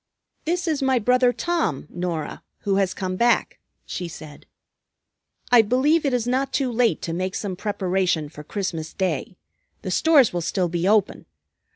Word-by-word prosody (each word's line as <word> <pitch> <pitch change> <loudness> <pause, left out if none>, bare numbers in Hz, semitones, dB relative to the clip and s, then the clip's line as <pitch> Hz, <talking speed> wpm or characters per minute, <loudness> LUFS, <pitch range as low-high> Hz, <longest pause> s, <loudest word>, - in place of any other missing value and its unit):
"This 350 +2 -1
is 305 -3 0
my 265 -1 +2
brother 250 +2 +3
Tom, 330 - -1
Norah, 175 -3 -4 0.2
who 195 -1 0
has 195 -2 +1
come 185 -1 -3
back," 240 +3 +2 0.3
she 180 - -5
said. 155 -3 -11 1.0
"I 245 -2 +8
believe 275 +8 +2
it - - +1
is 240 -2 -1
not 265 +2 0
too 265 -2 0
late 235 -1 +1
to 165 - -3
make 185 +3 -2
some 200 -4 -3
preparation 185 -5 -1
for 150 0 -11
Christmas 165 -2 -4
Day. 180 -2 -2 0.5
The 185 - -3
stores 285 - +4
will 175 - -1
still 175 +1 0
be 175 +2 -1
open. 210 -1 +1
200 Hz, 165 wpm, -23 LUFS, 180-250 Hz, 1.0 s, I